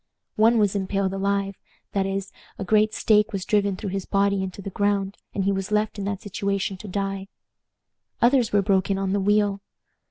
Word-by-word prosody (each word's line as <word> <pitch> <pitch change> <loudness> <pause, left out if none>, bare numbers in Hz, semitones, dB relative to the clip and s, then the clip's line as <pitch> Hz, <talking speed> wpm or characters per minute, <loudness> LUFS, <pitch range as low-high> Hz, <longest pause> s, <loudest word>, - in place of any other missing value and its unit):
One 225 +2 +4
was 205 -2 +2
impaled 195 0 -1
alive; 195 0 -1 0.3
that 195 -1 0
is, 195 0 -3 0.3
a - - -4
great 215 +2 +3
stake 210 -1 +3
was 195 -2 -3
driven 200 -2 +2
through 190 +1 -5
his 195 -1 -3
body 200 -1 +2
into 190 0 -5
the 195 0 -6
ground, 200 0 0 0.2
and 195 - 0
he 200 - +2
was 195 0 -2
left 210 0 0
in 195 - -3
that 200 -1 -3
situation 200 -1 -2
to 210 - -10
die. 195 0 -3 0.9
Others 245 -1 +3
were 205 -1 +3
broken 195 0 +2
on 195 0 -1
the 200 - +1
wheel. 205 0 +2
200 Hz, 190 wpm, -24 LUFS, 195-205 Hz, 0.9 s, One